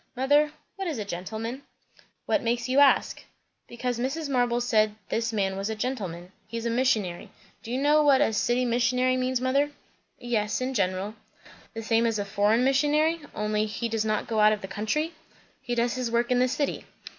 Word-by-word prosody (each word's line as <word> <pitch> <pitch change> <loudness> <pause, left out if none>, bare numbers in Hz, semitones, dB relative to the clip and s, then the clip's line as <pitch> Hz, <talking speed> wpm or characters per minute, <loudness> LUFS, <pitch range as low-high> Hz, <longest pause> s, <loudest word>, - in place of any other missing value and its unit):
Mother, 290 +4 +3 0.3
what 385 -1 -3
is 310 -6 -2
a 210 - -4
'gentleman'?" 220 +7 -5 0.6
"What 310 - +1
makes 235 0 -1
you 260 +2 +3
ask?" 285 -1 +4 0.4
"Because 245 0 -3
Mrs. 285 +5 -2
Marble 245 -2 +1
said 215 -3 +2
this 225 0 -1
man 195 -3 0
was 195 +2 -3
a 220 - -2
gentleman. 190 -8 -4 0.2
He's 230 0 -5
a 235 - 0
missionary. 225 -8 0 0.3
Do 230 - -8
you 250 - 0
know 295 +2 +4
what 285 -3 +5
a 220 - +2
'city 240 +4 +1
missionary' 250 +2 +2
means, 255 0 0
mother?" 275 +3 +1 0.5
"Yes, 220 -4 -1
in 255 +1 -2
general." 190 -1 -1 0.6
"The 225 - -5
same 225 +1 +2
as 225 -2 0
a 205 - -2
foreign 205 +4 +2
missionary, 300 +5 +2
only 210 0 0
he 225 +3 -3
does 225 -1 -1
not 215 -1 -1
go 225 -2 -1
out 215 0 +6
of 210 - -4
the 190 - -6
country?" 260 - -2 0.5
"He 240 - -3
does 235 0 +1
his 255 -2 -2
work 235 +1 0
in 250 - +3
the 255 - +4
city." 280 +3 -2
235 Hz, 190 wpm, -26 LUFS, 215-260 Hz, 0.6 s, out